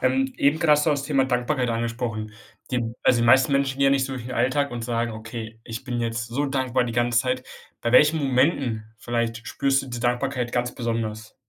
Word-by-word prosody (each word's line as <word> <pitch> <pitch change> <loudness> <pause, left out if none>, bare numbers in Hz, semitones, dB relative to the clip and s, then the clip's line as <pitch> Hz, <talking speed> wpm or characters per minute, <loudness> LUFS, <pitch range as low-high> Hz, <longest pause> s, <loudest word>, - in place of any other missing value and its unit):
Ähm, 130 +1 +1
eben 145 +3 +2
grad 160 - +3
hast 150 - 0
du - - +4
das 145 -1 0
Thema 135 -2 +2
Dankbarkeit 125 0 0
angesprochen. 115 -2 -3 0.4
Die 125 -1 0 0.2
also 120 - +4
die 120 - +2
meisten 130 +3 +5
Menschen 140 -1 +1
gehen 140 - +4
ja - - +5
nicht 135 -1 +2
so 135 - -6
durch 125 -2 -6
den 130 - -6
Alltag 135 +4 +1
und 120 -1 -5
sagen: 120 -1 -1
„Okay, 110 0 -7
ich 115 +2 -6
bin 125 -2 -4
jetzt 115 +1 -2
so 140 +5 -1
dankbar 130 -2 0
die 115 - -4
ganze 120 -1 +2
Zeit.“ 125 0 0 0.4
Bei 120 - -1
welchen 150 +5 +5
Momenten 130 -4 +1
vielleicht 115 0 -2
spürst 135 -1 +1
du 135 - -10
die 120 -1 -5
Dankbarkeit 125 0 -1
ganz 125 0 -1
besonders? 115 -2 -4
125 Hz, 220 wpm, -24 LUFS, 115-135 Hz, 0.4 s, meisten